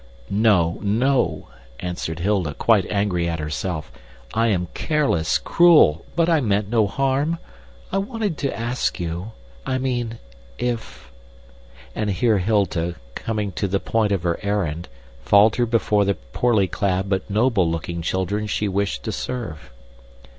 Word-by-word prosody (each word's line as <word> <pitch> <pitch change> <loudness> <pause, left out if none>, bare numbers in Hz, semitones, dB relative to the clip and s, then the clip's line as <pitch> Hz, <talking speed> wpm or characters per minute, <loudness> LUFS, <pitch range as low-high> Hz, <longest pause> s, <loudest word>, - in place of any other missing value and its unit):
"No, 100 -5 +3
no," 120 +6 +1 0.3
answered 85 -3 -4
Hilda, 90 -5 0
quite 110 -5 +3
angry 95 -4 0
at 85 - -2
herself. 75 +1 -4 0.4
"I 115 +1 +2
am 90 -5 0
careless, 140 - +1
cruel, 160 - +5
but 170 0 +3
I 165 -3 +3
meant 105 -3 0
no 110 -3 +3
harm. 135 +7 0 0.5
I 195 - +1
wanted 210 -3 -2
to 140 -4 -2
ask 120 -1 -1
you 90 +5 -4 0.3
I 130 - -1
mean, 120 -3 -2 0.4
if 120 - -4 0.4
" - - -23
And 105 -1 -1
here 105 +2 +2
Hilda, 90 -4 0 0.2
coming 105 - -3
to 100 +2 -2
the 95 +1 0
point 110 0 0
of 95 -4 0
her 85 -1 0
errand, 90 -5 -2 0.4
faltered 110 +3 +4
before 105 -3 +2
the 100 0 +1
poorly 100 - +1
clad 95 +1 -1
but 95 +1 -1
noble 105 -4 +2
looking 85 +1 -3
children 95 +5 -1
she 105 0 -1
wished 95 -11 -1
to - - -3
serve. 85 - -5
100 Hz, 145 wpm, -22 LUFS, 85-115 Hz, 0.5 s, cruel